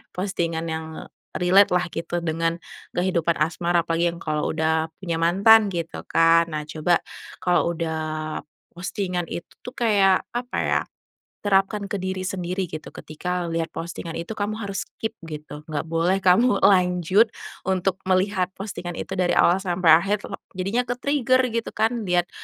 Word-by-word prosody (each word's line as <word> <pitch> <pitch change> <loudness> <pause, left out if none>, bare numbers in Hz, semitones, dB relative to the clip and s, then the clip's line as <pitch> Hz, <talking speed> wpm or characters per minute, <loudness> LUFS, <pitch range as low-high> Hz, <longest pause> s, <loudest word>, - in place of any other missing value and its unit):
postingan 170 -4 -2
yang 160 0 -3 0.5
relate 185 +2 +4
lah 180 -1 +1
gitu 170 +1 -3
dengan 165 +1 -1 0.3
kehidupan 170 -3 0
asmara 170 +2 +1
apalagi 170 +1 +1
yang 170 - -11
kalau 150 -1 -1
udah 160 0 +1 0.2
punya 170 -3 -2
mantan 200 +5 +5
gitu 170 -1 -4
kan. 165 0 +4
Nah 150 - -1
coba 160 +3 +1 0.4
kalau 175 -1 +2
udah 160 -1 -2 0.8
postingan 180 0 -2
itu 170 - -6 0.2
tuh 250 - -7
kayak 205 -7 +3
apa 245 +1 -4
ya - - +1 0.6
terapkan 200 0 +1
ke 205 - -2
diri 190 0 -3
sendiri 185 0 -3
gitu 155 -1 -8
ketika 175 +3 -4
lihat 165 0 -2
postingan 170 0 -6
itu 170 +7 -5
kamu 215 +2 -2
harus 200 -2 -3 0.2
keep 220 0 -3
gitu, 150 -1 -8
nggak 155 +1 -4
boleh 170 +4 +1
kamu 200 +4 +4
lanjut 180 +2 +4 0.4
untuk 190 0 0
melihat 185 0 +1
postingan 185 -3 -6
itu 190 +3 -5
dari 180 -1 +2
awal 175 - +5
sampai 180 -2 +1
akhir 195 +6 +5
tulok - - -7 0.2
jadinya 200 +7 -1
ke-trigger 255 +1 +1
gitu 230 0 -3
kan 220 +1 0
lihat, 175 -1 +1
180 Hz, 150 wpm, -24 LUFS, 165-195 Hz, 0.8 s, mantan